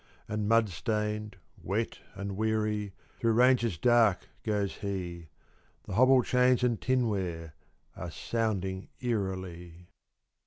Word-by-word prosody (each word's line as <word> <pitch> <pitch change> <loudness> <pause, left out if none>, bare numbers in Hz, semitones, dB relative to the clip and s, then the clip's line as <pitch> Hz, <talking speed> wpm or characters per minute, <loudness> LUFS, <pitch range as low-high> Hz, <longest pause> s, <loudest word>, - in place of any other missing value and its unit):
And 105 -1 -2
mud 115 -1 +5
stained, 105 +4 -2 0.3
wet, 110 +5 -2 0.2
and 100 -1 -4
weary, 105 -1 0 0.3
Through 115 -1 +2
ranges 120 -5 +4
dark 115 -3 +3
goes 105 -2 -1
he; 90 -4 -4 0.6
The - - -7
hobble 130 +4 +5
chains 125 0 +3
and 120 -3 +1
tinware 95 -11 -1 0.4
Are - - -6
sounding 95 -5 -2
eerily. 95 -6 -4
105 Hz, 110 wpm, -30 LUFS, 95-115 Hz, 0.6 s, mud